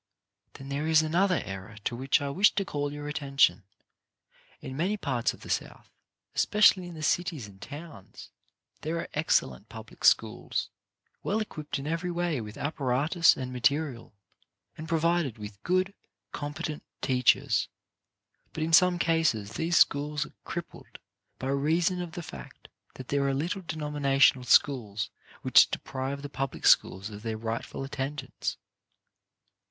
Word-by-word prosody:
Then 135 0 -10
there 145 +3 -2
is 160 -1 +5
another 180 +4 +2
error 95 +3 -7
to 120 - -2
which 135 +4 +1
I 140 - -2
wish 195 +8 +4
to 195 - 0
call 145 -6 -2
your 145 0 -6
attention. 140 -5 +2 1.0
In 130 - -7
many 185 +8 0
parts 125 - 0
of - - -14
the - - -11
South, - - -4 0.4
especially 200 -3 +4
in 175 - -9
the 155 - -7
cities 160 - 0
and 95 -1 -16
towns, 145 - -10 0.5
there 160 +2 -2
are 170 - -4
ex 150 +2 +3
cellent 65 -2 -11
public - - -11
schools, - - +2 0.5
well 215 - 0
equipped 155 -8 -4
in 135 - -6
every 165 +3 -2
way 170 -6 -1
with 105 0 -9
apparatus 145 +3 +2
and 130 -1 -5
material, 140 -1 0 0.6
and 160 +1 -8
provided 165 -6 +1
with 105 -2 -9
good, 185 +2 +1 0.4
competent 150 +1 -5 0.2
teachers, 125 -2 +3 0.9
but 155 - -2
in 165 +1 -2
some 180 +1 +6
cases 160 -12 +1
these 165 +7 0
schools 150 +1 +3
are - - -15
crippled 170 -1 -7 0.4
by 130 - -4
reason 160 +6 +1
of 170 -2 -6
the 175 -2 -6
fact 70 - -11 0.3
that 130 - -10
there 140 -1 +1
are 135 - +1
little 170 +7 -2
denominational 145 -5 +2
schools 105 -6 +2 0.3
which - - +7
deprive 135 +1 -4
the - - -4
public 135 -1 -4
schools 95 +3 +4
of 105 0 -9
their 110 -1 -3
rightful 115 +4 -4
at 135 - -10
tendance. 135 0 -4
145 Hz, 150 wpm, -28 LUFS, 130-165 Hz, 1.0 s, which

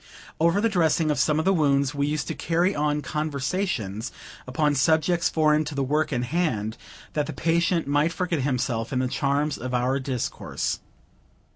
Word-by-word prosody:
Over 170 +5 +3
the 230 - +3
dressing 165 -5 +2
of 145 - -1
some 150 +2 +2
of 160 - 0
the 195 - +4
wounds, 140 -4 +2
we 140 0 0
used 150 -1 -2
to - - -1
carry 175 +4 +1
on 150 -1 0
conversations 140 - -2 0.4
upon 145 +4 +1
subjects 160 +5 +2
foreign 155 -1 +3
to 150 0 -5
the 140 - 0
work 150 +4 0
in 120 -3 0
hand, 125 -7 -1 0.4
that 150 -2 0
the - - -5
patient 170 +1 +1
might 145 +3 +2
forget 175 -2 -1
himself 125 -4 -1
in 130 - -1
the 130 0 +1
charms 140 +3 0
of 125 +1 -3
our 125 +3 +1
discourse. 130 -3 -3
150 Hz, 175 wpm, -25 LUFS, 130-165 Hz, 0.4 s, the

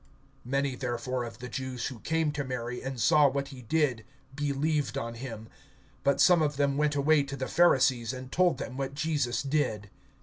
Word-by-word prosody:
(45)Many 135 -1 0
therefore 125 0 -2
of 115 - -9
the 125 - -7
Jews 130 0 -4
who 130 -4 -5
came 160 +2 0
to 145 -1 -3
Mary, 125 -2 -4
and 135 -1 -5
saw 145 +6 +5
what 140 +1 -3
he 135 -3 -10
did, 130 -2 0 0.3
believed 145 0 -1
on 115 -4 -3
him. 115 -3 -7 0.6
(46)But 140 - +3
some 175 -3 +6
of 150 -2 0
them 140 -1 +2
went 150 0 +1
away 145 +1 +4
to 140 0 -5
the 130 -1 -3
Pharisees, 130 -8 +3
and 130 0 -8
told 180 0 +3
them 130 - -6
what 135 0 -3
Jesus 145 -5 0
did. 125 -8 -1
135 Hz, 190 wpm, -29 LUFS, 125-145 Hz, 0.6 s, some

